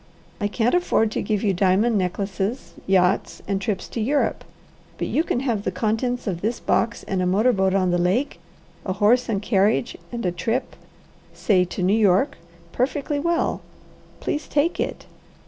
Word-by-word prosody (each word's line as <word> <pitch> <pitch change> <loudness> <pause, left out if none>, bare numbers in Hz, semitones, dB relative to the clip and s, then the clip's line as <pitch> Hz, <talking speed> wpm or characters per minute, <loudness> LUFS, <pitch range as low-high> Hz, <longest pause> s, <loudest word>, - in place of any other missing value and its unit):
I 205 - 0
can't 225 +3 0
afford 290 -11 +2
to - - -2
give 210 -1 -1
you 200 -3 +2
diamond 195 +5 +2
necklaces, 195 +4 -2
yachts, 190 0 +2
and 195 -1 -1
trips 200 -1 -2
to 230 - -4
Europe; 280 +6 0 0.5
but - - -2
you 315 - +1
can 250 - -1
have 235 -7 -1
the 200 - -2
contents 225 +6 -1
of 180 -5 -3
this 230 +3 -1
box 235 0 0
and 190 -1 -2
a 180 - +1
motor 215 +7 +3
boat 190 -2 +1
on 185 -2 +2
the 175 - +1
lake, 190 +11 0 0.4
a 185 - -2
horse 230 +6 +3
and 205 -2 -1
carriage, 210 +2 +2 0.2
and 235 -3 -4
a 180 - +1
trip 225 +9 -2 0.6
say 185 -4 +2
to 180 +1 -4
New 190 +3 +3
York 200 +1 +3 0.3
perfectly 285 +3 -1
well. 340 +2 0 0.6
Please 300 - -2
take 300 +4 +1
it." - - -3
210 Hz, 175 wpm, -23 LUFS, 190-245 Hz, 0.6 s, motor